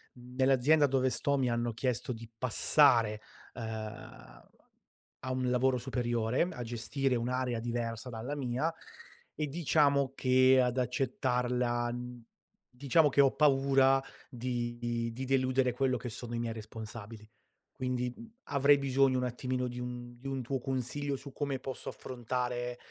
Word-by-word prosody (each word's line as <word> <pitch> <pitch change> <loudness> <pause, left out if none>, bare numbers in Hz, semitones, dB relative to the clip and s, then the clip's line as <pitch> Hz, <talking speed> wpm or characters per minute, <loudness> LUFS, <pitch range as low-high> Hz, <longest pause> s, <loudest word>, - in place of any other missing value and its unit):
Nell'azienda 130 +4 +3
dove 130 -1 +2
sto 140 +2 0
mi 130 -2 +1
hanno 120 0 -1
chiesto 125 0 -2
di 115 0 -10
passare, 115 -3 +3 0.3
ehm, 110 - -8 0.8
a 130 - -2
un 130 -1 0
lavoro 125 +1 +2
superiore, 120 -2 -1
a 125 - -6
gestire 120 +3 -1
un'area 125 0 -1
diversa 115 0 -3
dalla 120 +5 -5
mia, 135 +4 -1 0.6
e 150 - -2
diciamo 140 -3 +2
che, 130 0 +5
ad 125 0 0
accettarla, 125 -1 0
mhmm, 125 0 -7 0.5
diciamo 140 +4 +3
che 140 - +4
ho 135 -1 +5
paura 135 -2 +4 0.3
di 120 -2 -3
di 130 +3 -5
deludere 130 -1 +2
quello 130 0 +1
che 125 +1 -6
sono 120 +1 -7
i - - -2
miei 115 -1 -2
responsabili. 110 0 -9 0.6
Quindi 125 -1 -1 0.3
avrei, 140 0 +4
bisogno 135 -1 +2
un 125 - 0
attimino 125 +1 -2
di 120 0 -6
un 120 0 -6
di 135 - -8
un 135 -1 -2
tuo 135 +3 -2
consiglio 135 +3 -2
su 140 +1 -9
come 140 -2 -2
posso 130 0 -6
affrontare 125 0 -3
125 Hz, 140 wpm, -31 LUFS, 120-135 Hz, 0.8 s, che